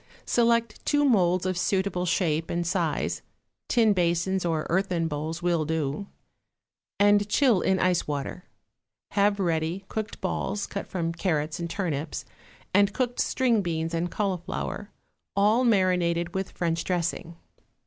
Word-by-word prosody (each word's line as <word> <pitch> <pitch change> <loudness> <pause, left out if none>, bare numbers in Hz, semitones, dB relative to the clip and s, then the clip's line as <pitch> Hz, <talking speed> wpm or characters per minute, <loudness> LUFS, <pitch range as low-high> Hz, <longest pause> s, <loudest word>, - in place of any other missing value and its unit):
= - - -29
Select 235 -1 +2
two 290 -1 +2
moulds 185 -8 +3
of 185 0 0
suitable 190 -1 0
shape 165 -3 +1
and 170 0 -1
size 170 -4 -1 0.5
(tin 225 -4 +4
basins 175 +1 +1
or 160 -3 0
earthen 175 -2 0
bowls 160 +2 -4
will 170 -3 +2
do) 155 +3 -2 0.9
and 205 0 +4
chill 235 -4 +4
in 190 - +2
ice 180 -2 +2
water. 145 +5 -4 0.7
Have 200 0 +2
ready 170 +1 -1
cooked 215 -1 -4
balls, 205 - -2
cut 200 - -5
from 165 -3 -2
carrots 155 -3 -1
and 170 0 -3
turnips, 155 -7 -3 0.5
and 200 +1 +4
cooked 245 -2 -1
string 240 -5 +2
beans 165 -2 -2
and 170 +1 -1
cauliflower, 195 +1 -3 0.5
all 210 +5 +4
marinated 180 -6 +2
with 190 0 -2
French 165 -1 -1
dressing. 170 -1 -2
180 Hz, 140 wpm, -26 LUFS, 165-200 Hz, 0.9 s, tin